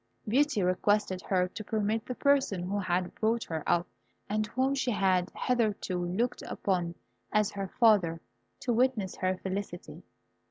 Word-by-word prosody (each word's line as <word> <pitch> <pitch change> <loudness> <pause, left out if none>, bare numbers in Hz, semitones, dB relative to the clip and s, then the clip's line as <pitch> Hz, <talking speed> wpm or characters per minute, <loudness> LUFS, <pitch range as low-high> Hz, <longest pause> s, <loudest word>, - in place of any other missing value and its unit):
Beauty 265 -2 +2
requested 185 +1 +1
her 180 -1 +1
to 215 - -7
permit 215 +2 -1
the 250 - -3
person 270 -11 +2
who 200 +3 -1
had 180 -1 -1
brought 225 +1 0
her 160 -2 -4
up, 175 0 +2 0.4
and 215 +1 0
whom 260 +5 +1
she 265 -2 0
had 190 -4 +2
hitherto 210 -7 0
looked 225 +8 -1
upon 175 -3 -1 0.4
as 210 -1 +2
her 195 -1 -4
father, 200 -8 +4 0.4
to 245 - 0
witness 230 -5 +1
her 185 0 0
felicity. 190 -1 -5
205 Hz, 150 wpm, -30 LUFS, 185-230 Hz, 0.4 s, father